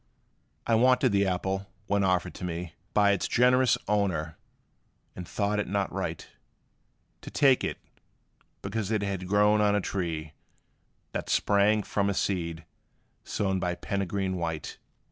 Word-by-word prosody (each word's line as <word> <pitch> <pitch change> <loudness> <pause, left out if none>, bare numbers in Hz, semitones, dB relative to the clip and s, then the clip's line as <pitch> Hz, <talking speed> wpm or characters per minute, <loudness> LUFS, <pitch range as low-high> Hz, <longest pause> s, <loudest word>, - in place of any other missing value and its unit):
I 115 - +1
wanted 125 +2 +4
the 100 -1 +2
apple, 95 +1 -2 0.2
when 100 -1 +1
offered 90 -2 +1
to - - -9
me 85 -1 -4 0.2
By 100 -1 +4
its 100 - 0
generous 125 +1 +4
owner, 90 -7 0 0.8
but 90 -1 -8
thought 105 +4 -1
it 105 - -1
not 100 0 -1
right - - -4 0.9
To - - -8
take 135 -3 +4
it, - - -2 0.9
because 100 0 -3
it 110 -2 0
had 95 -2 -3
grown 105 +2 +4
on 105 -1 +3
a - - +3
tree, 80 -6 -3 0.8
That - - -4
sprang 105 +1 +3
from 100 0 0
a 100 - -1
seed 85 -5 -2 0.6
sown 95 -2 -1
by 90 -1 -1
PEREGRINE 95 0 -2
WHITE. 80 -3 -4
100 Hz, 145 wpm, -28 LUFS, 90-105 Hz, 0.9 s, wanted